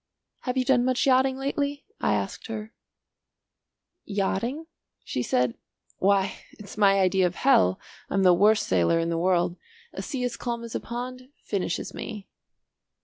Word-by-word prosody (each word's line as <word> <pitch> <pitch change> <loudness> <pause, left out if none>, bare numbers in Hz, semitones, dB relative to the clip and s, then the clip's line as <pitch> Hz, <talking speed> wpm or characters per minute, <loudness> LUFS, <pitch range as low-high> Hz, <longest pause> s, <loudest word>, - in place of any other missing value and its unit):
"Have 250 0 -3
you 255 - +2
done 245 -1 +4
much 255 0 +1
yachting 260 0 +3
lately?" 280 +1 -2
I 105 - +2
asked 100 -1 -4
her. 220 0 -6 1.3
"Yachting?" 220 +9 -2 0.4
she 125 - -3
said, 125 -1 +1 0.4
"why 195 0 +2 0.2
it's 210 - -11
my 200 -2 +4
idea 190 -1 +3
of 175 - -6
hell. 95 - +4 0.3
I'm 195 - +1
the 180 -1 +7
worst 210 +4 +4
sailor 90 - +2
in 165 0 0
the 165 -1 0
world. 175 0 +1 0.4
A - - -5
sea 265 -4 -4
as 245 -1 -2
calm 235 -1 -3
as 230 - -7
a - - -1
pond 255 +2 -6
finishes 190 -4 -2
me." 210 -3 -7
210 Hz, 155 wpm, -26 LUFS, 180-255 Hz, 1.3 s, the